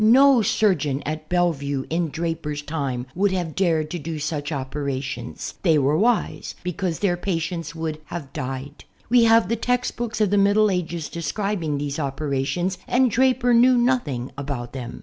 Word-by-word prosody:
No 260 +3 +7
surgeon 155 -10 +1
at 155 +1 -4
Bellevue 145 -6 0
in 165 0 0
Draper's 160 -2 -3
time 140 -6 -3
would 200 +2 +2
have 175 -4 -2
dared 165 -5 +1
to 175 - -3
do 160 +1 -5
such 150 0 -3
operations. 135 -3 -4
They 165 -5 +4
were 140 +1 +2
wise, 230 +7 0
because 180 -1 -2
their 190 -4 +1
patients 165 -3 -3
would 160 -1 -4
have 150 -6 -7
died. 135 +3 -6 0.2
We 240 -1 +6
have 225 0 +5
the 230 - +1
text 245 +2 -1
books 235 -1 -3
of 210 -3 +2
the 205 - +4
Middle 205 +1 +4
Ages 170 -3 -2
describing 170 -3 -2
these 145 +1 -3
operations 145 +6 -1
and 250 -1 +3
Draper 250 0 +3
knew 245 +2 +6
nothing 240 - 0
about 135 -4 -5
them. 125 -3 -6
165 Hz, 165 wpm, -23 LUFS, 145-205 Hz, 0.2 s, No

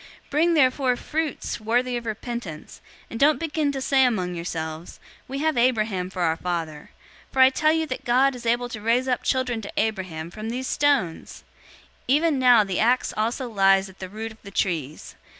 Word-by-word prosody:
003:008 - - -30
Bring 305 +4 +3
forth 335 - +2
therefore 260 -3 +3
fruits 310 +1 -3
worthy 245 +3 0
of 235 -1 -5
repentance, 220 -7 -6 0.3
and 230 - -5
don't 290 -1 +4
begin 310 -2 -1
to 275 - -4
say 265 0 +3
among 190 -8 0
yourselves, 165 -1 -5 0.3
'We 270 - -5
have 315 -3 +1
Abraham 215 -7 +1
for 185 -1 -3
our 160 -1 +1
father;' 165 -4 -4 0.4
for 265 - -3
I 260 0 +8
tell 310 +3 +2
you 320 0 +1
that 255 -4 -5
God 260 +3 +3
is 240 -2 -7
able 240 +1 +1
to 220 -3 -7
raise 235 +4 +1
up 250 -1 0
children 255 -3 -1
to 200 - -8
Abraham 185 -7 -2
from 215 +3 -6
these 255 +3 -3
stones! 265 - 0 0.7
003:009 265 - +5
Even 310 -2 +2
now 245 -4 +6
the 195 -2 -3
axe 245 +3 +2
also 235 +4 -1
lies 195 -3 +3
at 190 - -17
the 185 - -6
root 220 +3 -6
of 220 - -17
the 200 - -10
trees. 160 -7 -3
235 Hz, 200 wpm, -24 LUFS, 190-260 Hz, 0.7 s, I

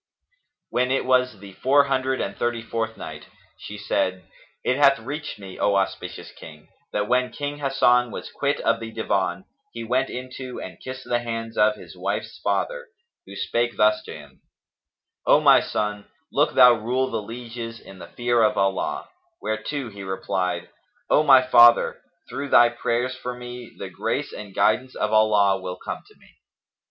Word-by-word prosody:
When 125 +1 +1
it 135 0 0
was 125 -2 +2
the 100 0 -12
Four 140 +7 +4
Hundred 130 -1 0
and 100 - -3
Thirty 120 -1 -2
fourth 110 0 -3
Night, - - -8 0.3
She - - -8
said, 95 0 -1 0.4
It 130 - +1
hath 140 -1 +5
reached 145 +7 -6
me, 95 -2 -10
O 100 - +2
auspicious 95 -1 -3
King, 75 -2 -14 0.2
that 105 0 -1
when 125 +1 +2
King 145 0 -5
Hasan 125 -3 +3
was - - -7
quit - - -1
of - - +1
the 115 0 -7
Divan, 95 -4 -1 0.3
he 115 - -6
went 125 +3 0
in 125 0 -6
to 130 -2 -7
and 90 -2 -9
kissed 130 0 -7
the 120 - +1
hands 115 -1 -5
of 105 0 +3
his - - -13
wife's - - -4
father, - - -1 0.4
who - - -10
spake 120 0 -1
thus 105 0 +4
to - - -8
him, 75 -3 -14 0.9
"O - - +6
my - - +7
son, 105 -1 -3 0.3
look 145 - +1
thou 125 -1 +8
rule 125 +4 -1
the 115 - -2
lieges 115 +1 -7
in 95 - -14
the 85 - -9
fear 120 +4 0
of 110 - +3
Allah;" 95 -1 0 0.3
whereto 115 +4 -3
he 100 -1 -10
replied, 95 -1 -2 0.4
"O - - +6
my 135 -4 +7
father, 120 -2 +6 0.3
through 140 0 -5
thy 120 -2 +7
prayers 120 +1 -1
for 125 -1 -6
me, 125 -1 -9
the - - -7
grace - - -3
and 100 -2 -9
guidance 130 +4 +1
of 105 0 -1
Allah 105 -3 +4
will 90 0 -5
come - - -6
to - - -21
me." - - -23
115 Hz, 175 wpm, -24 LUFS, 105-130 Hz, 0.9 s, thou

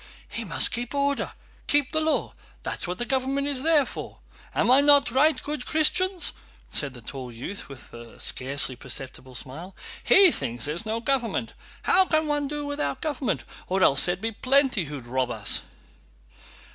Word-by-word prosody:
"He 230 - -5
must 170 -6 +3
keep 245 +3 -4
order, 280 0 0 0.3
keep 290 -2 +2
the 315 - +1
law, 315 0 0 0.3
that's - - -1
what 180 +1 -4
the 240 - -3
government 270 +2 0
is 280 -3 0
there 305 -2 +4
for. - - -8 0.4
Am - - +2
I 265 +2 +7
not 285 -3 +5
right, 300 +5 +3
good 295 -3 -4
Christians?" 350 +4 +2 0.4
said 140 -3 -1
the 125 - -11
tall 130 +1 -6
youth, 130 - -7
with 130 -7 -13
a 120 -1 -12
scarcely 135 0 0
perceptible 130 +1 -5
smile. 160 +10 -5 0.3
"He 385 -3 +7
thinks 120 - -3
there's 165 +9 -2
no 225 +1 -2
government! 240 -4 -1 0.3
How 380 - +5
can 315 -3 +1
one 295 -1 -1
do 295 +1 -4
without 285 +1 -2
government? 255 - -2 0.2
Or 190 +1 +1
else 135 - +6
there 175 - +2
would 180 - -9
be 225 +1 -2
plenty 255 - +2
who'd 140 -4 -8
rob 130 +1 -1
us." 105 -3 +2
235 Hz, 175 wpm, -25 LUFS, -, 0.4 s, I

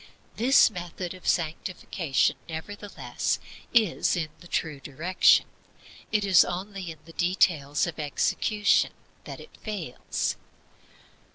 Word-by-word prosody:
This 250 0 +5
method 175 -1 -6
of 185 - -11
sanctification, 165 -2 0
nevertheless, 205 +6 -3 0.3
is 220 -7 +3
in 160 -2 -2
the 175 - -14
true 155 -4 -2
direction. 160 +7 +3 0.7
It 210 -2 +2
is 190 -3 +7
only 190 0 -5
in 160 - -8
the 165 - -13
details 165 -5 +2
of 170 -2 -6
execution 210 +8 +1 0.3
that - - -8
it - - -14
fails. 200 - -3
175 Hz, 110 wpm, -27 LUFS, 160-200 Hz, 0.7 s, is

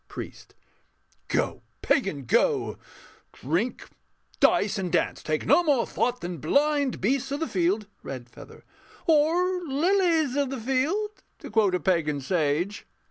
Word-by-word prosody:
PRIEST. - - -9 0.7
Go, - - -1 0.2
pagan, 195 - +1
go! - - +1 0.5
Drink, 175 - -2 0.5
dice, 205 0 +3
and 180 -3 -3
dance: 175 - 0
take 155 0 -2
no 350 - +5
more 285 -7 +2
thought 250 0 -1
than 175 0 -5
blind 285 - +1
Beasts 265 +6 0
of 285 - -2
the 325 - -1
field.... 190 +4 0 0.2
REDFEATHER. 120 -3 -10 0.4
Or... 340 +4 +3
lilies 325 -1 +2
of 285 -2 +1
the 270 -1 -4
field, 320 - -1 0.2
To - - -10
quote 210 -4 +3
a - - 0
pagan 155 -4 +1
sage. 160 +5 -1
245 Hz, 135 wpm, -26 LUFS, -, 0.7 s, no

